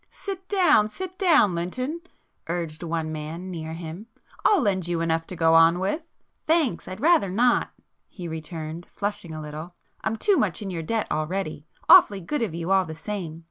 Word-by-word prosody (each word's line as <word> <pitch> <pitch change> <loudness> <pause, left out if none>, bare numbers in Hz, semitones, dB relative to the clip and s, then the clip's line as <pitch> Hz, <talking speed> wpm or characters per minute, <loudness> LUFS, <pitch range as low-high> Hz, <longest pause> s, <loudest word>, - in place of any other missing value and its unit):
"Sit 380 -2 -7
down, 360 - +4
sit 370 +11 -7
down, 315 - +5
Lynton!" 255 - -3 0.5
urged 165 -2 -3
one 165 -2 -2
man 160 +4 -6
near 160 -2 -5
him. 170 +5 -7 0.4
"I'll 415 - +5
lend 190 - 0
you 175 -1 -1
enough 165 0 0
to 185 - -7
go 165 -1 +3
on 165 +1 +6
with." 195 - -1 0.5
"Thanks, 310 - +1
I'd 185 +2 -7
rather 320 - +4
not!" 240 +6 +2 0.4
he 180 -4 -8
returned, 160 +1 -6
flushing 205 -4 -3
a 155 - -6
little. 155 +3 -8 0.3
[p - - 0
109] - - -3
"I'm - - -2
too 400 - +3
much 190 -6 0
in 195 - -4
your 170 -2 -3
debt 220 +7 -1
already. 155 -1 -3 0.2
Awfully 200 -1 +8
good 250 - -3
of 210 -8 -2
you 170 +2 -3
all 190 -1 +4
the 160 -2 -7
same. 170 -3 -5
180 Hz, 190 wpm, -25 LUFS, 165-220 Hz, 0.5 s, Awfully